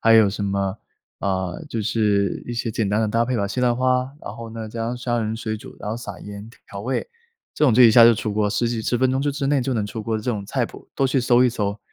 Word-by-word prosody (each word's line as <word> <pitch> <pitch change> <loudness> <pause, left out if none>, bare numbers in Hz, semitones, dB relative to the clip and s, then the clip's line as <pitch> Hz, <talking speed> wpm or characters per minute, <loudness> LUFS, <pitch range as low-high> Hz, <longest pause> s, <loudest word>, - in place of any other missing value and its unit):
还 115 0 +5
有 110 -2 +7
什 100 +1 -3
么， 100 0 -1 0.4
呃， 95 -3 -2
就 115 - -3
是 105 -3 +1
一 120 - -5
些 115 -1 -2
简 105 -2 0
单 105 +2 +1
的 110 - +2
搭 115 +2 +1
配 125 0 -1
吧， 100 -2 0
西 125 +5 -3
兰 120 -1 +3
花， 130 +1 +1
然 110 - -8
后 115 -1 -8
呢 110 -1 -6
加 115 +1 -4
上 120 +1 -3
虾 120 -1 -1
仁 110 +1 -2
水 110 -1 -3
煮， 130 +5 -12
然 - - -6
后 110 - -2
撒 105 -5 -7
盐 105 +2 -9 0.2
调 100 -2 -7
味， 130 - -2 0.5
这 150 - +2
种 130 - +5
就 125 +2 +7
一 115 - +8
下 120 - +8
就 115 0 +8
出 105 -2 -3
锅 105 -1 +1
十 120 +3 0
几 115 -2 -2
10 120 - 0
分 130 0 +2
钟 135 +1 0
就 145 - +1
之 140 -1 -2
内 140 -1 +2
就 130 +1 -1
能 105 -3 -1
出 110 +2 -6
锅 110 +1 -1
的 110 - -5
这 - - -5
种 105 -5 -1
菜 - - -1
谱， - - -14
都 135 - +2
去 130 0 +1
搜 125 0 +4
一 - - +5
搜， 105 -3 -2
115 Hz, 310 characters per minute, -22 LUFS, 105-125 Hz, 0.5 s, 一